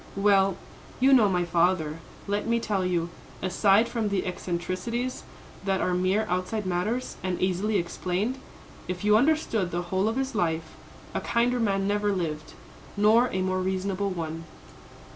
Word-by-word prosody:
"Well, 195 Hz, -1 st, +3 dB, 0.4 s
you 265 Hz, +2 st, +5 dB
know 225 Hz, -6 st, +6 dB
my 180 Hz, -2 st, +1 dB
father. 170 Hz, -2 st, +1 dB, 0.3 s
Let 205 Hz, +1 st, -2 dB
me 235 Hz, 0 st, +2 dB
tell 205 Hz, -4 st, -1 dB
you, 175 Hz, -2 st, -1 dB, 0.3 s
aside 195 Hz, +4 st, +3 dB
from 225 Hz, -4 st, -1 dB
the 200 Hz, -2 st, -1 dB
eccentricities, 185 Hz, +7 st, -3 dB, 0.4 s
that 195 Hz, -1 st, 0 dB
are 180 Hz, -, 0 dB
mere 185 Hz, +4 st, +1 dB
outside 185 Hz, +4 st, -2 dB
matters, 200 Hz, +8 st, -2 dB
and 185 Hz, -1 st, -2 dB
easily 190 Hz, +3 st, +1 dB
explained, 185 Hz, +7 st, -2 dB, 0.5 s
if 180 Hz, +1 st, -4 dB
you 210 Hz, 0 st, +5 dB
understood 235 Hz, -, +2 dB
the 175 Hz, 0 st, -2 dB
whole 190 Hz, +2 st, +2 dB
of 225 Hz, -, -2 dB
his 270 Hz, 0 st, -1 dB
life, 160 Hz, -5 st, -1 dB, 0.4 s
a -, -, -1 dB
kinder 240 Hz, +1 st, +1 dB
man 195 Hz, -3 st, +1 dB
never 205 Hz, 0 st, +1 dB
lived, 160 Hz, -5 st, -3 dB, 0.4 s
nor 220 Hz, +4 st, +5 dB
a 185 Hz, 0 st, -1 dB
more 185 Hz, 0 st, 0 dB
reasonable 190 Hz, +1 st, -1 dB
one. 165 Hz, -2 st, -5 dB
195 Hz, 155 wpm, -27 LUFS, 180-215 Hz, 0.5 s, know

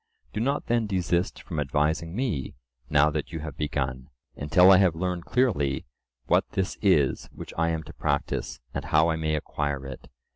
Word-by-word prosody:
Do -, -, -2 dB
not 140 Hz, +6 st, 0 dB
then 115 Hz, -2 st, +1 dB
desist 90 Hz, -2 st, -1 dB
from 80 Hz, -4 st, -4 dB
advising 80 Hz, +4 st, 0 dB
me, 110 Hz, -, -2 dB, 0.3 s
now 75 Hz, 0 st, +4 dB
that 75 Hz, -1 st, -3 dB
you 80 Hz, -2 st, -5 dB
have 75 Hz, -3 st, -6 dB
begun, 65 Hz, -4 st, -3 dB, 0.3 s
until 90 Hz, +6 st, +5 dB
I 95 Hz, -, +8 dB
have 90 Hz, -4 st, +3 dB
learned 90 Hz, 0 st, -2 dB
clearly 85 Hz, -, +1 dB, 0.4 s
what -, -, +2 dB
this 95 Hz, -1 st, -1 dB
is 80 Hz, -10 st, +2 dB
which -, -, -9 dB
I 85 Hz, +1 st, +1 dB
am 80 Hz, -1 st, -2 dB
to 80 Hz, +3 st, -11 dB
practise, 70 Hz, -2 st, -2 dB
and -, -, -4 dB
how 80 Hz, +2 st, +3 dB
I -, -, 0 dB
may 80 Hz, -1 st, 0 dB
acquire 70 Hz, -2 st, -3 dB
it. 65 Hz, -1 st, -9 dB
80 Hz, 180 wpm, -26 LUFS, 75-90 Hz, 0.4 s, I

